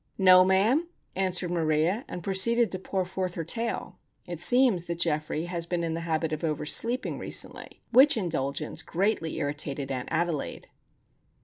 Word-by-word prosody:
"No, 185 -1 +7
ma'am," 210 - +2 0.3
answered 185 -2 +1
Maria; 165 - 0
and 175 - -7
proceeded 225 +5 +2
to 185 - -3
pour 190 0 -2
forth 185 0 -4
her 165 - -3
tale. 230 +8 -3 0.3
It 175 -3 -6
seems 225 -2 +4
that 170 -1 -4
Geoffrey 155 -2 -1
has 170 -1 -4
been 175 -1 -2
in 165 -1 -2
the 165 - -3
habit 160 0 -1
of 155 - -5
over 155 -2 -2
sleeping 240 +10 +1
recently, - - -3
which 260 +2 +6
indulgence 150 -5 -2
greatly 175 -2 -1
irritated 145 -1 -3
Aunt 125 -1 -4
Adelaide. 165 -2 -2
175 Hz, 155 wpm, -27 LUFS, 160-195 Hz, 0.3 s, No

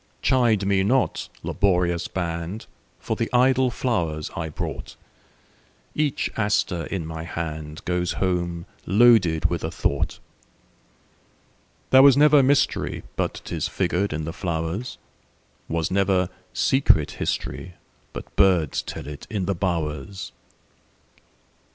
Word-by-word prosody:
Chide 115 -6 +3
me 100 -1 +2
not, 125 +6 +1
laborious 90 -3 +1
band, 85 +3 -4 0.3
For - - -3
the - - -2
idle 130 +1 +4
flowers 85 - -2
I 80 -3 -3
brought; 75 - -6 1.0
Every 150 -1 +2 0.2
aster 100 -6 0
in 95 -5 -3
my 80 0 -6
handGoes 85 +2 -3
home 85 -2 -1 0.2
loaded 100 -6 +5
with 85 - -2
a 80 - -1
thought. 80 - -1 1.7
There 130 - +8
was 140 -1 +7
never 150 0 +6
mysteryBut 140 +2 0
'tis - - -3
figured 100 +3 -1
in 75 0 -3
the 80 - -5
flowers; 85 +6 -3 0.7
SWas 80 0 -1
never 95 -2 +2 0.2
secret 130 - +2
historyBut 90 0 -6
birds 90 -7 +3
tell - - -7
it 75 0 -9
in 100 -4 -2
the 100 - 0
bowers. 85 0 -3
90 Hz, 110 wpm, -24 LUFS, 80-110 Hz, 1.7 s, There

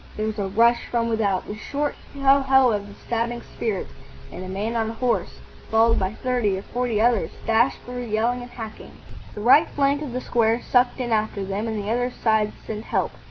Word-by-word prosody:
There 215 - -1
was 215 0 -3
a 195 - -1
rush 230 +4 +3
from 235 -1 0
without, 205 -4 0
the 205 - -6
short 285 +6 -2 0.2
hough 275 0 +3
hough 265 -3 +5
of 205 -1 -3
the 200 - -12
stabbing 235 +1 -3
spears, 215 -5 -3 0.5
and 180 - -7
a - - -7
man 205 +5 -3
on 225 -1 0
a - - -5
horse, 245 +1 -1 0.3
followed 225 +1 +4
by 190 +2 -2
thirty 245 -6 0
or 190 - -6
forty 245 -3 -1
others, 230 -1 +2 0.2
dashed 225 +3 +3
through, 245 0 -5
yelling 230 +3 0
and 245 - -9
hacking. 225 -3 -9 0.4
The 210 - -6
right 255 +7 +6
flank 280 0 +2
of 280 -5 -5
the 250 - -1
square 230 -1 +2
sucked 245 +1 +2
in 245 -2 -2
after 215 -2 0
them, 200 +3 -3
and 220 -1 -2
the 205 +1 -3
other 245 +1 +1
sides 220 -3 +1
sent 220 0 -5
help. - - 0
230 Hz, 210 wpm, -23 LUFS, 215-245 Hz, 0.5 s, right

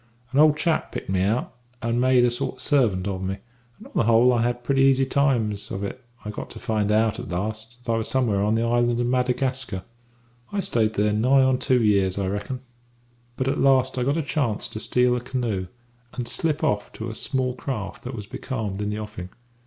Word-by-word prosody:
An 135 - +2
old 150 -1 +6
chap 165 0 0
picked - - -5
me 95 -1 +1
out, 105 +6 0 0.3
and 115 +1 0
made 130 -1 +5
a 120 - +2
sort 130 +3 -2
of 130 - -9
servant 115 -10 +2
of 95 -2 -3
me, 95 +1 -2 0.4
and, - - -14
on - - -14
the - - +2
whole, 115 +2 +5
I 120 - +2
had 120 +1 -1
pretty 135 +2 +2
easy 135 0 +4
times 120 -7 +1
of 95 - -4
it 125 +6 -5 0.2
I 105 - -3
got - - -7
to - - -10
find 110 -4 0
out, 110 0 +2
at - - -7
last, 110 +6 -4
that 115 - -2
I 115 - +2
was 110 - -2
somewhere 115 -7 +1
on 105 +2 +2
the 115 - +1
island 120 0 +2
of 120 - +1
Madagascar. 125 -4 -1 0.7
"I 205 - -1
stayed 110 - +1
here 105 +1 +2
nigh 130 +5 +4
on 130 -1 +2
two 125 -2 +2
years, 100 -3 +2
I 95 -2 -1
reckon; 105 +6 -4 0.8
but 130 - -1
at 135 - 0
last 130 -1 +3
I - - +1
got 140 +5 +1
a 165 - 0
chance 135 -7 -1
to 110 - -6
steal 125 +2 +2
a 125 - -2
canoe 120 -7 -2 0.5
and 125 -2 -3
slip 155 +4 -1
off 105 0 0
to 110 +1 -5
a - - -7
small 130 +2 -1
craft 125 -6 -5
that 125 0 -5
was 105 -3 -6
becalmed 105 -4 -4
in 105 - -1
the 105 - -3
offing. 105 -4 -7
120 Hz, 225 wpm, -24 LUFS, 105-130 Hz, 0.8 s, old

